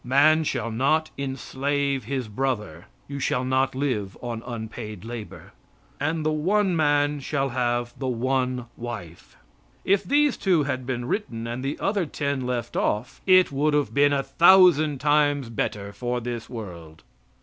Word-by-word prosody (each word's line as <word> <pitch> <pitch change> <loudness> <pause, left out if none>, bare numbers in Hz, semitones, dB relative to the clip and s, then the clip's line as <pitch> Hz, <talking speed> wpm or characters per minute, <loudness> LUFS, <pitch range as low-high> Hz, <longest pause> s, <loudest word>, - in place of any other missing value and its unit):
Man 150 +5 +4
shall 120 -5 -2
not 140 +7 +1
enslave 140 0 -2
his 130 -4 -3
brother, 105 -8 -3 0.2
(you 140 0 -5
shall 130 -1 0
not 130 +1 +1
live 125 -9 -2
on 120 -2 -5
unpaid 110 -3 -6
labor), 115 -2 -8 0.5
and 155 +1 -1
the 155 - +2
one 185 +5 +1
man 145 -1 +2
shall 135 0 -1
have 120 -1 -1
the 135 - -2
one 130 0 0
wife. 110 -9 -8 0.5
If 200 0 +3
these 290 -1 +2
two 180 -6 +2
had 130 -3 -3
been 120 -2 -2
written 120 - -3
and 120 +2 -4
the 140 +2 -2
other 200 -4 0
ten 140 -3 -2
left 120 -2 -3
off, 115 +5 -1
it 185 -3 +6
would 145 +2 +1
have 145 -1 0
been 145 +1 +4
a 140 -1 +1
thousand 165 -6 +5
times 145 -3 +2
better 100 -2 -3
for 125 +1 -2
this 120 -1 -5
world. 85 -9 -9
130 Hz, 155 wpm, -25 LUFS, 120-145 Hz, 0.5 s, it